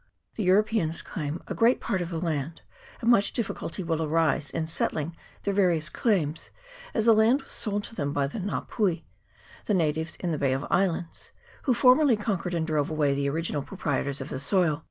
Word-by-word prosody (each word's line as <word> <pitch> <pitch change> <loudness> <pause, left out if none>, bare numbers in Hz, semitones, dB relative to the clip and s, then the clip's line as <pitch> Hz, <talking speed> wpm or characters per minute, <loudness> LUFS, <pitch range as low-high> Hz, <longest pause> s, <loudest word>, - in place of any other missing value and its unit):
The - - -4
Euro 190 +4 +5
peans 205 -7 -2
claim 155 0 -5
a - - -3
great 235 +2 +3
part 190 - -1
of 170 - -3
the 170 - -3
land, 160 -2 -3 0.4
and 235 - +4
much 205 -4 +3
difficulty 195 -5 -3
will 165 -1 -1
arise 155 -3 +1
in 160 - -2
settling 160 0 -2 0.3
their 200 - 0
various 175 -5 +2
claims, 165 -9 0 0.5
as 220 - +1
the 230 - +7
land 230 +6 +4
was - - -13
sold 205 -2 -1
to - - -8
them 145 -9 -2
by 140 -1 +1
the 140 +10 -5
Nga 200 +1 -3
pui, 190 -7 0 0.6
the 210 - +1
natives 160 -1 0
in 175 - -3
the 155 - -2
Bay 135 -2 +2
of 135 +2 -2
Islands, 175 -3 -1 0.3
who 255 -4 +3
formerly 255 0 +5
con 205 -3 -1
quered 180 0 -3
and 160 - 0
drove 155 -3 0
away 150 -3 +1
the 140 0 0
original 155 0 -2
proprietors 140 -4 -2
of 135 - -6
the 130 - -4
soil. 160 0 +2
170 Hz, 205 wpm, -27 LUFS, 150-205 Hz, 0.6 s, the